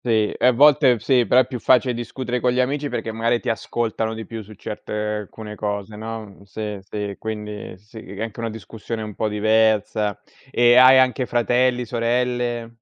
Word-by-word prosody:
Sì, 110 -3 +1
e - - 0
a 125 - +6
volte 135 -2 +5
sì, 125 -1 +2
però 125 - +5
è 130 - +1
più 130 -1 -5
facile 125 +1 +3
discutere 120 +1 -4
con 125 0 +1
gli 125 - +1
amici 140 +3 -1
perché 115 - -4
magari 115 +2 0
ti - - -6
ascoltano 115 0 -2
di 110 -1 -7
più 115 0 -7
su 105 +2 -13
certe 105 +1 -8
alcune 105 0 -4
cose, 105 0 -4
no 110 -2 -7
sì, 105 0 -6
sì, 100 0 -5
quindi 105 -3 -6
sì, 105 +3 -14 0.2
è 100 - -5
anche 115 0 -6
una 115 0 -2
discussione 110 +2 -7
un 105 -2 -7
po' 110 - -1
diversa 110 0 +1 0.4
e 120 0 +5
hai 130 +1 +8
anche 130 -1 +2
fratelli, 125 +1 +1
sorelle? 120 0 -1
115 Hz, 185 wpm, -22 LUFS, 105-125 Hz, 0.4 s, hai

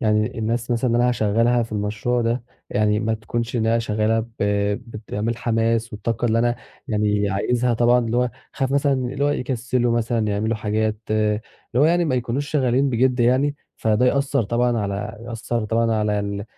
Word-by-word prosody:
يعني 110 +1 +1
الناس 115 +2 -2
مثلًا 120 +2 +1
اللي 120 - +2
أنا 125 - +3
هاشغلها 115 +1 +2
في 115 - -7
المشروع 105 +4 -1
ده 115 +1 -1 0.3
يعني 105 0 +2
ما 110 0 0
تكونش 115 +2 -3
إنها 115 0 +2
شغالة 110 0 +1
ب 110 - -6 0.6
بتعمل 110 +1 -4
حماس 115 -1 0
والطاقة 110 +2 -3
اللي 115 0 +2
أنا 120 +1 +1 0.3
يعني 105 -2 +1
عايزها 120 +5 +1
طبعًا 120 +2 +4
اللي 115 0 -1
هو 125 0 +2 0.2
هاخاف 135 -1 -1
مثلًا 140 0 +2
اللي 135 +2 -1
هو - - +3
يكسلوا 125 -2 0
مثلًا 115 -1 0
يعملوا 110 +2 0
حاجات 110 0 -1
اللي 105 0 +1 0.4
هو 145 - +5
يعني 170 +2 +3
ما 130 - 0
يكونوش 125 +4 -2
شغالين 135 -2 +2
بجِد 125 +1 +2
يعني، 135 +4 +2 0.2
فده 110 +3 +2
يأثّر 140 -1 +2
طبعًا 120 +2 +1
على 100 0 -3
يأثّر 115 -1 -3
طبعًا 115 +1 +1
على 105 -1 +1
ال 100 0 -4
115 Hz, 175 wpm, -22 LUFS, 110-125 Hz, 0.6 s, هو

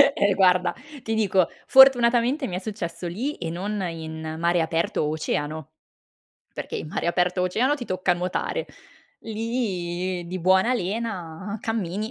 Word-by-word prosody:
Eh 200 0 +3
guarda, 180 -1 +3 0.3
ti 225 - -2
dico, 195 -5 +2 0.2
fortunatamente 260 +1 +6
mi 180 - -4
è - - -2
successo 185 -4 -5
lì 245 - -3
e 165 - -5
non 200 +5 -3
in 160 -1 -6
mare 170 +1 +2
aperto 165 +1 0
o 150 - 0
oceano, 155 -1 -3 0.8
perché - - -5
in - - -5
mare 160 - -3
aperto 180 +1 +1
o - - +2
oceano 245 +10 +2
ti 260 -5 -6
tocca 185 -2 0
nuotare. 180 - -2 0.5
Lì 185 -6 -3
di 185 +2 -4
buona 190 +7 +4
lena 195 -3 -4
cammini 215 -1 -2
185 Hz, 150 wpm, -24 LUFS, 170-225 Hz, 0.8 s, fortunatamente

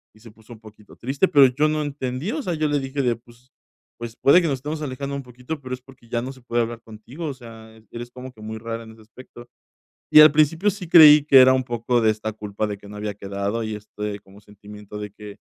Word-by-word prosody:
y - - -20
se 115 0 -15
puso 110 +2 -16
un 110 - -15
poquito 105 -1 -17
triste, 135 +9 0
pero 140 -5 +6
yo 140 +5 +1
no 155 0 -1
entendí, 140 - -4
o 310 +4 -3
sea, 180 - -2
yo 155 -1 -1
le 145 -1 0
dije 135 +1 -3
de: 120 -3 +1
"Pues, 120 +2 -22 0.5
pues, 115 -1 -8
puede 170 +6 +5
que 170 - -1
nos 140 - 0
estemos 150 +4 -6
alejando 140 0 -5
un 140 - -5
poquito, 125 +5 -8
pero 130 -1 -7
es 130 - -6
porque 125 -2 -19
ya 120 0 -1
no 130 +2 -6
se 130 - -18
puede 120 -1 -1
hablar 115 0 -6
contigo, 115 +9 -10
o 145 - -4
sea, 115 -3 -14
eres 120 +1 -8
como 125 +1 -10
que 110 - -17
muy 110 +1 -6
rara 115 +1 -6
en 110 - -13
ese 110 0 -17
aspecto". 120 +2 -15 0.6
Y - - +9
al 155 -1 +8
principio 155 +6 +2
sí 195 -3 -6
creí 150 -3 +9
que 140 -2 +6
era 130 0 +7
un 130 0 0
poco 120 0 -1
de 110 - +3
esta 110 0 -5
culpa 105 0 -4
de 105 -1 -5
que 100 - -15
no 105 - -10
había 105 0 -4
quedado 100 +3 -4
y 110 -1 -4
este 105 0 -7
como 100 0 -18
sentimiento 105 0 -12
de 105 -1 -7
que, 105 0 -12
120 Hz, 260 wpm, -22 LUFS, 110-140 Hz, 0.6 s, Y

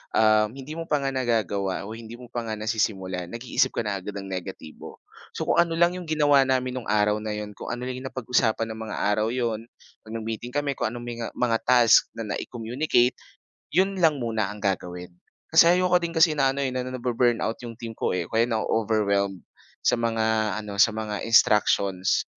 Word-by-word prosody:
um, 110 -1 +4
hindi 135 +2 -9
mo 165 0 -6
pa 145 -2 0
nga 135 - 0
nagagawa 105 -7 -1
o - - -7
hindi 115 0 -9
mo 120 -1 -13
pa 115 -1 -4
nga 110 - -2
nasisimulan, 95 -4 -2
nag-iisip 115 +6 -1
ka - - 0
na 100 -2 -2
agad 100 +2 -7
ng 100 -1 -6
negatibo. 90 -4 -8 0.3
So, - - -2
kung - - +2
ano 170 -1 +2
lang 170 +1 +4
'yong 180 -3 -7
ginawa 145 -3 +4
namin 130 -1 0
no'ng 120 - -11
araw 105 0 +2
na 105 -1 -4
'yon, 105 0 -5
kung 100 - -10
ano 125 - -7
lang 125 0 -4
napag-usapan 115 -3 0
ng 110 - -7
mga - - -5
araw 105 +1 +1
'yon, 115 -2 -2 0.4
'pag 110 - -10
nag-meeting 115 +2 -5
kami, 145 -1 0
kung - - +1
anong 120 +1 -6
menga 120 -1 -5
mga 115 -2 +1
task 120 -3 +6
na 115 - -4
na-i-communicate 120 +2 0 0.6
'yon 190 +1 +2
lang 160 -3 +4
muna 115 -6 -1
ang 105 +1 -8
gagawin. 90 -2 -3 0.4
Kasi 165 +2 +7
ayoko 180 -1 +3
din 170 0 -4
kasi 160 0 +5
na 135 -1 +3
ano 140 - -1
eh, 130 - -1
na 125 0 -3
na-bu-burnout 120 -2 0
'yong 120 -1 -8
team 115 0 -7
ko, 110 - -2
eh, 90 - -1
o - - -14
kaya 115 +1 +2
na-o-overwhelmed 105 -4 0 0.4
sa 120 - +2
mga 110 -2 0
ano, 100 -1 -7
sa 110 +1 +5
mga 105 -2 -3
instructions. 100 -4 +3
115 Hz, 200 wpm, -25 LUFS, 105-130 Hz, 0.6 s, Kasi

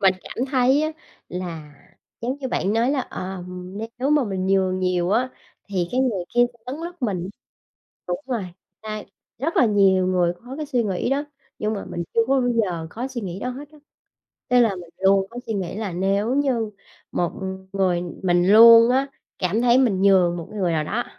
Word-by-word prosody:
mình 190 -1 +4
cảm 255 - -4
thấy 265 +2 +3
á 310 - 0 0.4
là 165 -5 -6 0.5
giống 255 +4 -2
như 265 -2 -4
bạn 200 -3 0
nói 230 +3 +2
là, 280 -2 +1
ờ, 185 -6 -6 0.5
nếu 270 +3 0
mà 295 -4 +4
mình 190 -2 -2
nhường 190 -1 +2
nhiều 180 0 0
á, 245 +4 +2 0.4
thì 180 -3 -1
cái 255 - +1
người 215 -9 0
kia 240 - +4
cũng 235 -2 -27
lấn 255 - -4
lướt 350 -3 -9
mình. 190 -6 -1 0.8
Đúng 175 +1 -2
rồi, 235 -7 -2 0.4
à, 215 -1 -5 0.4
rất 315 +7 -2
là 250 - +5
nhiều 195 -3 +4
người 180 -2 +2
có 260 +3 -8
cái 305 -1 -4
suy 250 -4 +1
nghĩ 195 +3 -1
đó, 285 +2 0 0.3
nhưng 215 +1 -1
mà 200 - -5
mình 170 0 -5
chưa 230 - +4
có 270 0 +3
bao 245 - +1
giờ 185 -9 -1
có 245 +7 -4
suy 250 -3 -5
nghĩ 185 -2 -5
đó 250 - -3
hết 275 +3 -8
á. 305 - -17 0.7
Nên 250 -1 +6
là 215 -4 +2
mình 175 -2 -10
luôn 195 0 +3
có 240 - -8
suy 225 - -2
nghĩ 190 -3 -3
là 210 -4 -3
nếu 200 +7 0
như 250 -6 +1 0.4
một 175 -1 0 0.4
người 185 -3 +1 0.2
mình 175 0 +3
luôn 230 +1 +9
á, 265 +2 +2 0.3
cảm 190 +5 0
thấy 245 +1 +5
mình 215 -8 +2
nhường 185 -3 +4
một 165 - -7
cái 210 -1 -6
người 175 -2 +1
nào 155 -1 0
đó, 230 +9 -2
210 Hz, 210 wpm, -23 LUFS, 185-250 Hz, 0.8 s, luôn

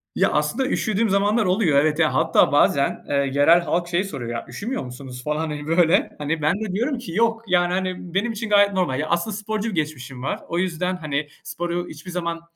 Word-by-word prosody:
Ya, - - +2
aslında 150 - 0
üşüdüğüm 220 -2 0
zamanlar 205 +3 +2
oluyor, 180 -6 +3
evet, 155 +2 +1
ya, 155 - +3
hatta 160 -3 +3
bazen, 140 -1 +2
eee, 145 - 0
yerel 145 +5 +4
halk 170 +2 -1
şey 175 +2 0
soruyor, 130 - -6
ya, 115 - -4
"Üşümüyor 230 - -4
musunuz?" 125 0 -9
falan, 150 +2 -1
hani, 150 -2 -4
böyle. 170 +3 +3
Hani, 150 +2 -2
ben 155 +3 +3
de 215 -4 -3
diyorum 250 +7 0
ki 240 -8 -8
"Yok, 225 +4 +1
yani, 180 -1 +2
hani, 185 -2 -3
benim 205 +5 0
için 220 0 -5
gayet 205 -1 +5
normal." 160 -8 0
Ya, 155 - -2
aslında 185 +5 0
sporcu 215 +1 -3
bir 205 - -5
geçmişim 135 -5 -4
var, - - -2
o 170 - -2
yüzden, 180 0 -1
hani, 150 -3 -3 0.2
sporu 175 0 -3
hiçbir 160 +4 -9
zaman, 170 -1 -3
175 Hz, 210 wpm, -22 LUFS, 150-200 Hz, 0.2 s, gayet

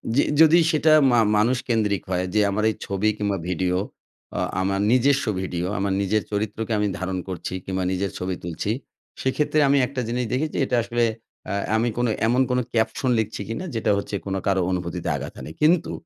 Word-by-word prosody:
জি, 140 - +5 0.2
যদি 160 +1 +7
সেটা 155 0 +3 0.2
মা 120 - +4 0.2
মানুষ 120 +5 +3
কেন্দ্রিক 105 -4 +1
হয় 90 0 0
যে 105 - +3
আমার 105 +2 -1
এই 110 - -2
ছবি 100 +2 0
কিংবা 100 -2 -1
ভিডিও 90 0 0 0.6
আ - - 0 0.2
আমার 95 +1 0
নিজস্ব 135 +3 +3 0.2
ভিডিও 90 -2 -3
আমার 100 0 0
নিজের 105 +2 +1
চরিত্রকে 110 +2 -2
আমি 105 - +1
ধারণ 95 +1 -2
করছি 90 -2 -5
কিংবা 95 -1 -2
নিজের 95 +1 -1
ছবি 90 0 -2
তুলছি 85 +4 -3 0.5
সেক্ষেত্রে 150 +3 +1
আমি 140 +1 +4
একটা 135 -1 -4
জিনিস 125 +1 -1
দেখেছি 150 +4 -1
এটা 125 - -1
আসলে 120 0 0 0.5
আ - - -1 0.2
আমি 115 +2 +2
কোনো 120 -1 +1 0.2
এমন 125 +3 +3
কোনো 125 0 +2
caption 115 +3 0
লিখছি 110 -1 -3
কিনা 115 - -4
যেটা 110 - +1
হচ্ছে 100 +1 -4
কোনো 95 -1 -2
কারো 95 -1 +2
অনুভূতিতে 90 -2 -3
আঘাত - - -6
হানে। - - -8
কিন্তু 165 +3 +3
110 Hz, 185 wpm, -23 LUFS, 95-125 Hz, 0.6 s, যদি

